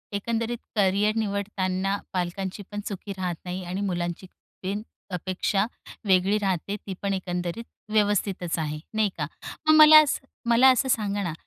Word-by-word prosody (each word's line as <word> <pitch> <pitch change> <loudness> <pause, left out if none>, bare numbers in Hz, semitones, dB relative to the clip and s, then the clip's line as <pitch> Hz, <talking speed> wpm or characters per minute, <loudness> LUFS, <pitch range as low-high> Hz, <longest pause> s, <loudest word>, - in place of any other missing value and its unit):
एकंदरीत 230 +3 -1 0.2
करिअर 205 +1 +2
निवडताना 200 -2 -1 0.2
पालकांची 185 +2 -3
पण 205 - -4
चुकी 200 0 -6
राहत 180 -2 -2
नाही 180 +1 -4
आणि 185 +3 -3
मुलांची 175 -2 -2 0.4
पण 200 +3 -2 0.3
अपेक्षा 185 +3 0 0.4
वेगळी 190 +2 +4
राहते, 195 -1 -1
ती 200 -1 -7
पण 200 -1 0
एकंदरीत 180 +2 -3 0.3
व्यवस्थितच 205 -5 +1
आहे, 150 -1 -3
नाही 215 -1 +2
का? 150 - -1 0.4
मग 310 - +7
मला 310 0 +10
असं 275 -2 -2 0.2
मला 240 +3 +7
असं 260 +1 +1
सांगा 205 -4 0
ना, 170 -4 -2
195 Hz, 145 wpm, -26 LUFS, 185-210 Hz, 0.4 s, मला